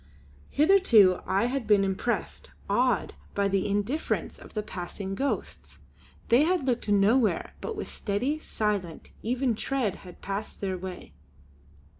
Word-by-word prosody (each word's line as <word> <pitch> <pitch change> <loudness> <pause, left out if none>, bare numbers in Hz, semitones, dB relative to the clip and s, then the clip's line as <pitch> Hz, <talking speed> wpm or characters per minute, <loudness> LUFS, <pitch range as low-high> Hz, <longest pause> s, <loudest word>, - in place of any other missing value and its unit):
Hitherto 280 - +5
I 195 +5 +2
had 255 0 -2
been 205 -2 +5
impressed, 195 +4 -2 0.2
awed, 245 +3 +1 0.2
by 200 0 +2
the 195 0 0
indifference 205 +10 -1
of - - -14
the 215 - -1
passing 190 0 -6
ghosts. 275 +8 -3 0.5
They 240 +4 +6
had 340 -1 +2
looked 245 -4 -1
nowhere, 210 +4 +3
but 450 - -4
with 415 - -5
steady, 250 +10 -2
silent, 205 - -3
even 245 +2 0
tread 225 -3 -1
had 180 -2 -13
passed 200 +1 -5
on 195 - 0
their 185 - -2
way. 185 0 -8
215 Hz, 140 wpm, -27 LUFS, 195-260 Hz, 0.5 s, They